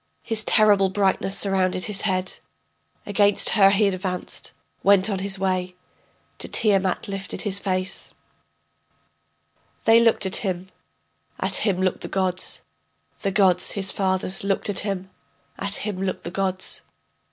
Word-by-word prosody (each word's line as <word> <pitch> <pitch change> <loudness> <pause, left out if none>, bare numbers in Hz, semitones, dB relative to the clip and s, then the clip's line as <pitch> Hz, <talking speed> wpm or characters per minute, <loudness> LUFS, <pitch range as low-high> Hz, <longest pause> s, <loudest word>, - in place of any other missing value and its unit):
His 220 -1 0
terrible 205 -4 +4
brightness 195 0 0
surrounded 185 -2 +1
his 205 -2 +1
head. 185 -3 -1 0.7
Against 205 0 +4
her 195 -3 +5
he 200 +1 +3
advanced, 185 -1 -3 0.3
went 200 +1 +4
on 195 - -2
his 195 +1 -1
way, 185 -1 -2 0.6
To - - -2
Tiamat 195 -4 +1
lifted 195 -1 -4
his 200 -2 +1
face. 185 -1 -3 1.7
They 225 +1 +6
looked 230 -3 +3
at 190 - +1
him, 185 -2 -3 0.7
at - - -1
him 195 -4 0
looked 185 -1 -1
the - - -6
gods, 185 -1 -1 0.6
The 200 - 0
gods, 185 -2 +2
his 195 -1 -1
fathers, 190 -1 -2
looked 200 +1 -1
at 195 - +1
him; 190 -2 -4 0.5
at 200 +1 -2
him 205 -3 -4
looked 190 -1 -3
the 170 - -6
gods. 190 0 -1
195 Hz, 140 wpm, -23 LUFS, 185-200 Hz, 1.7 s, They